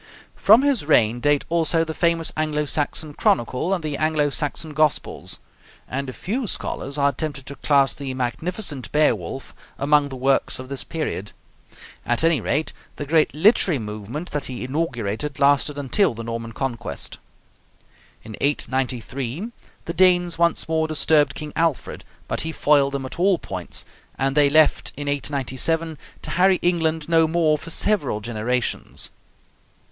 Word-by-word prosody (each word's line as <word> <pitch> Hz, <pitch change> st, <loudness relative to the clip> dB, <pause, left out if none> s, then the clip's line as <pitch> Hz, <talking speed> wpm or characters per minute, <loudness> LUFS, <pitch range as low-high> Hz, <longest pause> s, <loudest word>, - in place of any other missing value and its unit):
From 220 Hz, +6 st, +6 dB
his 280 Hz, -, +1 dB
reign 120 Hz, -6 st, +3 dB
date 145 Hz, +2 st, +2 dB
also 165 Hz, 0 st, +2 dB
the 160 Hz, -, -4 dB
famous 170 Hz, -1 st, +1 dB
Anglo 155 Hz, -1 st, 0 dB
Saxon 150 Hz, +1 st, -2 dB
Chronicle 125 Hz, +6 st, +1 dB
and 185 Hz, -4 st, 0 dB
the 150 Hz, -2 st, -2 dB
Anglo 155 Hz, -2 st, +1 dB
Saxon 150 Hz, +2 st, -2 dB
Gospels; 155 Hz, -1 st, 0 dB, 0.5 s
and 135 Hz, +1 st, -3 dB
a -, -, -4 dB
few 220 Hz, -, -3 dB
scholars 140 Hz, -6 st, -3 dB
are 140 Hz, 0 st, +3 dB
tempted 140 Hz, -1 st, -5 dB
to 140 Hz, -, -7 dB
class 140 Hz, -2 st, +3 dB
the 140 Hz, -1 st, -5 dB
magnificent 140 Hz, -, -2 dB
'Beowulf' 135 Hz, -, 0 dB, 0.2 s
among 145 Hz, +1 st, +3 dB
the 135 Hz, -, -7 dB
works 135 Hz, +1 st, +1 dB
of 130 Hz, 0 st, -9 dB
this 140 Hz, -1 st, -2 dB
period. 155 Hz, -, -4 dB, 0.7 s
At 120 Hz, +4 st, +1 dB
any 165 Hz, -3 st, +3 dB
rate, 155 Hz, +2 st, -1 dB, 0.2 s
the 145 Hz, -, -5 dB
great 155 Hz, +1 st, +3 dB
literary 180 Hz, -1 st, +4 dB
movement 110 Hz, -, -6 dB
that 145 Hz, -1 st, -2 dB
he 125 Hz, -1 st, -5 dB
inaugurated 130 Hz, -2 st, -2 dB
lasted 145 Hz, +1 st, +3 dB
until 145 Hz, -, +1 dB
the 115 Hz, -, -6 dB
Norman 115 Hz, 0 st, -5 dB
Conquest. 120 Hz, -2 st, -4 dB, 1.0 s
In 110 Hz, -, -8 dB
893 135 Hz, -, -2 dB, 0.3 s
the 165 Hz, -, -4 dB
Danes 175 Hz, -2 st, +3 dB
once 170 Hz, -1 st, +2 dB
more 160 Hz, 0 st, +1 dB
disturbed 150 Hz, -2 st, +2 dB
King 150 Hz, -1 st, -7 dB
Alfred, 165 Hz, -4 st, -1 dB, 0.2 s
but -, -, +1 dB
he 160 Hz, -, -2 dB
foiled 140 Hz, -3 st, +3 dB
them 135 Hz, -1 st, -3 dB
at 130 Hz, -, -8 dB
all 190 Hz, 0 st, +4 dB
points, 90 Hz, -, -4 dB, 0.3 s
and 135 Hz, 0 st, 0 dB
they 145 Hz, -1 st, +5 dB
left 155 Hz, +1 st, +3 dB
in 145 Hz, 0 st, -5 dB
897 145 Hz, +3 st, -1 dB, 0.3 s
to -, -, -6 dB
harry 185 Hz, +1 st, +4 dB
England 160 Hz, -3 st, +1 dB
no 165 Hz, -1 st, +4 dB
more 160 Hz, -1 st, +2 dB
for 160 Hz, +2 st, -8 dB
several 165 Hz, -, +1 dB
generations. 120 Hz, +3 st, -2 dB
145 Hz, 150 wpm, -22 LUFS, 130-165 Hz, 1.0 s, From